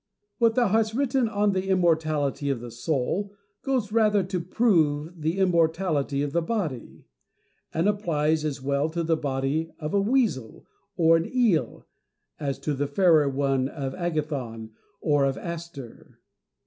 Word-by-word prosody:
What 230 -1 +3
thou 240 -4 +3
hast 220 +1 +1
written 265 -3 +1
on 205 -1 +1
the 190 0 -2
immortality 155 -6 +1
of 135 -3 -1
the 120 0 -8
soul 160 - -2 0.3
goes 255 -6 -1
rather 210 -3 +3
to 185 0 -3
prove 165 -5 +1
the 160 +4 -1
immortality 165 -5 +1
of 145 - -3
the 170 - +1
body; 165 - -4 0.7
and 165 +4 0
applies 160 -7 +1
as 145 -3 -3
well 140 +2 0
to 170 +1 -2
the 165 0 +2
body 145 +2 -2
of 155 -1 -5
a 200 - +3
weasel 210 - 0 0.3
or 165 -1 +5
an 165 - -3
eel 235 -10 +1 0.5
as 140 -3 -2
to 150 - -1
the 145 +1 -1
fairer 155 -2 +4
one 135 -1 0
of 135 -4 -5
Agathon 145 -10 -3 0.3
or 145 -3 +2
of 135 -1 0
Aster. 170 -8 -8
160 Hz, 150 wpm, -26 LUFS, 140-195 Hz, 0.7 s, or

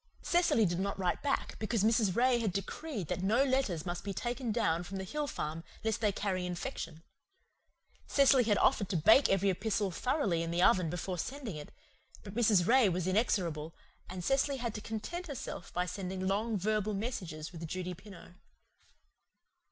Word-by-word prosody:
Cecily 345 -11 +3
did 175 -1 -1
not 200 +1 -2
write 180 -2 -1
back, 285 - -1
because 220 -1 0
Mrs. 220 -4 +3
Ray 245 0 +3
had 220 -4 0
decreed 200 - -4
that - - -2
no 220 +8 +3
letters 260 - 0
must 175 -1 -4
be 200 -1 -4
taken 240 0 -2
down 205 -7 +1
from 185 +2 -6
the 190 - -4
hill 295 +9 -3
farm 160 - -4 0.2
lest 220 0 -1
they 210 -2 +3
carry 190 -2 -2
infection. 175 -3 -5 1.0
Cecily 275 -3 +5
had 210 -2 +3
offered 200 -3 +2
to 185 - 0
bake 220 - +6
every 195 0 +3
epistle 200 +1 -1
thoroughly 210 - 0
in 165 - -3
the 170 +1 -1
oven 185 -3 +4
before 180 +1 -4
sending 260 - -4
it; 150 -1 -8 0.5
but 200 - -9
Mrs. 210 -6 +4
Ray 245 -1 +5
was 180 -1 -1
inexorable, 180 -6 0 0.3
and 180 0 -6
Cecily 270 +3 +1
had 235 -3 -3
to 210 - -6
content 340 +13 -5
herself 270 - -6
by 180 0 0
sending 185 0 -4
long 210 +3 0
verbal 215 +1 0
messages 185 -8 -4
with 165 -2 -7
Judy 180 +2 -4
Pineau. 185 -1 -13
200 Hz, 175 wpm, -32 LUFS, 180-235 Hz, 1.0 s, bake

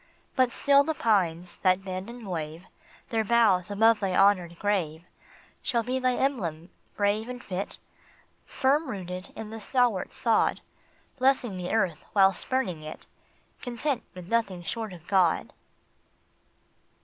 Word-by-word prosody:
But 255 -3 +3
still 280 +2 +4
the 320 +2 -2
pines 180 - +1
that 185 0 +2
bend 185 +2 -5
and 235 -3 -9
wave 160 -1 -4 0.5
Their 225 -3 +1
boughs 215 -5 +3
above 225 +2 +4
thy 190 -3 -1
honored 180 -4 +3
grave 170 -6 -1 0.6
Shall 235 -1 0
be 255 +3 -1
thy 255 -1 +1
emblem 180 - -2 0.3
brave 210 +3 +1
and 250 0 -5
fit, 195 -3 -5 0.7
Firm 280 +3 +1
rooted 185 -3 -6
in 220 -1 -7
the 225 - -6
stalwart 240 -5 +1
sod, 230 -3 +1 0.6
Blessing 255 -5 +2
the 180 -1 -4
earth 180 -8 0
while 195 -1 +6
spurning 185 -7 -2
it, 155 0 -9 0.6
Content 250 +2 -2
with 180 -1 -9
nothing 200 -5 0
short 220 +5 -4
of 175 -2 -12
God. 180 -3 +2
205 Hz, 135 wpm, -27 LUFS, 180-240 Hz, 0.7 s, while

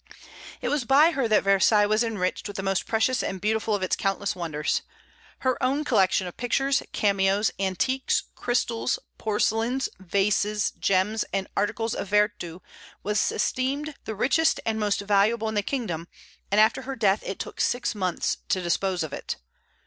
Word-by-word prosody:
It - - -1
was 295 -3 0
by 285 +7 +5
her 270 -7 0
that 215 -1 +3
Versailles 200 +2 +4
was 215 +2 +2
enriched 205 -5 -2
with 205 0 -7
the 195 - -3
most 195 -1 0
precious 225 +3 +1
and 190 - -3
beautiful 215 +2 0
of 195 - -3
its 185 - +1
countless 195 0 -1
wonders. 155 -4 -1 0.6
Her 260 0 0
own 275 +3 +1
collection 195 -8 +2
of 175 - -7
pictures, 270 +3 +1
cameos, 200 0 +2
antiques, 200 +8 0
crystals, 240 0 -1 0.2
porcelains, 225 +4 0
vases, 200 +3 +1
gems, 195 +3 +1
and 195 -1 -1
articles 220 +2 0
of - - -4
vertu 205 -4 0 0.4
was 210 0 +1
esteemed 280 +4 -1
the 220 - -4
richest 305 +9 +2
and 220 -1 0
most 205 -1 0
valuable 210 +3 +2
in 220 - -2
the 205 - +1
kingdom, 195 - -3 0.4
and 205 - +3
after 215 +1 +4
her 270 0 -5
death 210 -4 +2
it 195 - -5
took - - -5
six 245 0 0
months 185 -4 -1
to 185 - +2
dispose 180 0 0
of 155 -3 -6
it. - - -4
210 Hz, 165 wpm, -26 LUFS, 195-235 Hz, 0.6 s, by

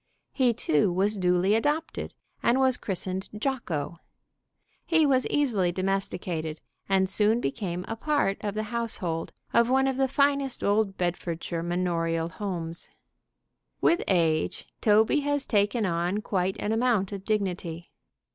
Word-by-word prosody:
He, 255 -3 +3
too, 185 -5 +1
was 195 +4 +1
duly 180 +1 +2
adopted, 295 +8 -1 0.3
and 245 +3 +3
was 260 -1 +4
christened 190 -2 -3
Jocko. 180 - -2 0.9
He 325 -2 +3
was 260 -3 +3
easily 225 -12 +1
domesticated 180 -4 -2 0.3
and 190 -1 +3
soon 210 +4 +2
became 180 - -3
a 225 - -3
part 285 -5 0
of 205 -1 -2
the 215 - -1
household 185 -8 -2 0.2
of 235 0 +4
one 265 +1 +3
of 265 -1 0
the 270 0 +2
finest 280 -1 +1
old 205 -1 +1
Bedfordshire 170 -1 -2
manorial 165 -1 -1
homes. 170 -4 -4 0.9
With 340 - +3
age 165 -4 +1 0.2
Toby 220 +6 +4
has 285 -1 -1
taken 210 +1 +1
on 175 +3 0
quite 190 -1 0
an 210 - -1
amount 225 -4 +1
of 195 -2 -6
dignity. 180 -5 -2
200 Hz, 135 wpm, -27 LUFS, 175-240 Hz, 0.9 s, was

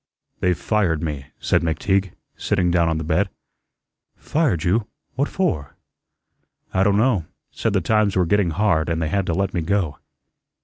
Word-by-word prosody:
"They've 90 -2 +1
fired 90 -7 0
me," 75 -4 -4
said - - +2
McTeague, 95 +4 0 0.2
sitting 90 -4 0
down 85 -2 +3
on 80 - 0
the 80 - -3
bed. 80 0 +1 0.9
"Fired 145 - 0
you! 105 +5 +1 0.3
What 140 +3 0
for?" 140 - -1 1.0
"I 95 - +2
don' 100 0 +3
know. 110 -7 +2 0.3
Said - - -1
the - - +2
times 110 -2 +2
were 90 -1 +3
getting 100 +1 +2
hard 85 -2 +1
an' 85 - 0
they 80 -1 -1
had 100 +2 0
to 85 - 0
let 95 -1 -1
me 85 - 0
go." 85 -4 -1
90 Hz, 170 wpm, -22 LUFS, 80-105 Hz, 1.0 s, down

